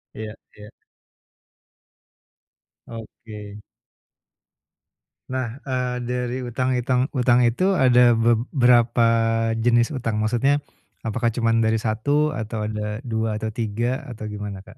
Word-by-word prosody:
Iya 110 0 -6 0.2
iya. 105 0 -12 2.2
Oke. 105 -2 -10 1.8
Nah, 130 -2 -3
eee, 125 -1 -2
dari 125 0 -2
utang 125 +2 -2
itang 125 +2 0
utang 125 0 +4
itu 125 +12 +2
ada 125 -6 +5
beb 115 0 +2
berapa 120 -2 +4 0.5
jenis 120 +1 +2
utang? 115 -4 -2
Maksudnya, 130 +6 +1 0.4
apakah 115 +1 -1
cuman 115 -1 +1
dari 110 0 +1
1 145 +8 +1
atau 110 -6 -4
ada 105 +1 -4
2 110 -3 -2
atau 110 - -2
3 120 +5 -2
atau 110 -2 -7
gimana 105 -2 -6
Kak? 105 +3 -16
120 Hz, 115 wpm, -23 LUFS, 110-125 Hz, 2.2 s, ada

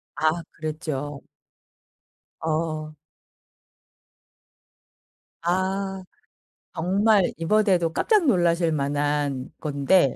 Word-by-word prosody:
아 155 +3 +1
그랬죠. 150 -3 -4 1.2
어. 155 -1 -2 2.5
아. 190 +2 -1 0.7
정말 195 +3 +3
이번에도 175 -2 +2
깜짝 425 -6 +3
놀라실 170 - +3
만한 145 -2 -1
건데 145 0 +3
165 Hz, 125 characters per minute, -24 LUFS, 150-190 Hz, 2.5 s, 정말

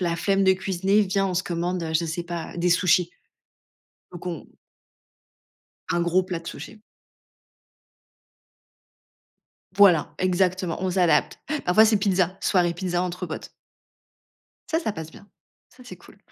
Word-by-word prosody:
la 170 -2 0
flemme 195 +3 +1
de 190 - +6
cuisiner. 190 +2 +1
Viens, 195 -1 +1
on 185 - -3
se 185 - 0
commande, 170 -1 -3
je 170 - -2
sais 165 +2 -3
pas, 170 0 -6
des 175 +1 +1
sushis». 180 0 +3 1.0
Donc 175 +1 -9
on 170 -4 -5 1.4
Un 175 - 0
gros 175 +2 +2
plat 180 -2 -5
de 170 - -17
sushi. 215 +4 -9 2.9
Voilà. 180 -7 +5
Exactement, 185 -1 0
on 185 - 0
s'adapte. 180 -2 +2 0.3
Parfois, 195 +5 +5
c'est 220 0 +3
pizza, 190 -2 +1
soirée 175 -3 +1
pizza 175 0 -2
entre 180 0 -4
potes. 155 - -7 1.2
Ça, 320 - 0
ça 220 -11 -2
passe 160 -2 -8
bien, 200 - -16 0.4
ça, 255 - -18
c'est - - -10
cool. - - -19
180 Hz, 140 wpm, -24 LUFS, 175-195 Hz, 2.9 s, de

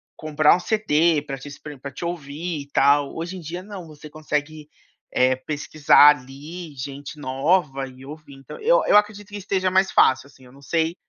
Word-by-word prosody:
comprar 155 -1 +3
um - - -3
CD 170 -7 +1
pra 135 -2 -5
te 135 +3 -11
espr 145 0 -10
pra 140 +1 -8
te 135 - -9
ouvir 160 -1 -5
e 140 - -12
tal, 140 +1 +3
hoje 170 +3 -5
em 180 - -9
dia 170 +3 -6
não, 195 -4 -9
você 150 -1 -13
consegue, 150 0 -4 0.4
eh, 130 0 +3
pesquisar 145 +1 +4
ali 150 +6 -10
gente 140 +2 -8
nova 135 0 0
e 130 +1 -14
ouvir, 150 -1 -11
então 135 -1 -11
eu - - +4
eu 210 - +6
acredito 210 -1 0
que 205 - -9
esteja 190 -1 -1
mais 190 +1 +2
fácil, 130 +1 +3
assim, 135 -2 -20
eu 125 - -17
não 140 - -17
sei, 165 +3 -1
150 Hz, 195 wpm, -22 LUFS, 140-175 Hz, 0.4 s, eu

